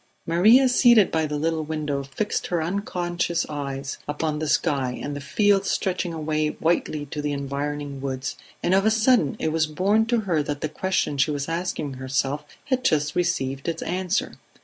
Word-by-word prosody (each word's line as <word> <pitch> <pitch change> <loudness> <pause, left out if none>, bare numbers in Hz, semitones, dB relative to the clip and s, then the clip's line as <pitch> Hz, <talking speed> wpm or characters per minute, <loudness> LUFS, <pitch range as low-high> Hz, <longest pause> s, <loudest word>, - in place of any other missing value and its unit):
Maria 215 +11 +6
seated 240 -5 +5
by 160 -1 +1
the 150 0 -3
little 160 +1 0
window 150 -2 -2
fixed 140 +10 -3
her 175 - 0
unconscious 175 -1 -1
eyes 140 -2 -4
upon 150 +1 -2
the 155 - -2
sky 135 -4 0
and 145 0 -4
the 145 - -5
fields 200 +6 +2
stretching 180 -2 -1
away 155 -1 -1
whitely 155 -1 -1
to 150 +1 -5
the 145 0 -1
environing 140 0 -4
woods, 130 -1 -3 0.3
and 180 - +2
of 195 +1 +4
a 220 - +4
sudden 220 - +3
it 160 - -1
was 160 -1 +1
borne 195 +8 +2
to 235 -1 +2
her 175 -7 +1
that 145 0 -4
the 155 - 0
question 185 -6 -1
she 140 - +3
was 145 -1 -2
asking 165 -4 -3
herself 135 +2 -1 0.2
had 260 -3 0
just 150 - +2
received 135 -6 -1
its 165 -1 -2
answer. 185 +3 -1
155 Hz, 180 wpm, -24 LUFS, 145-185 Hz, 0.3 s, Maria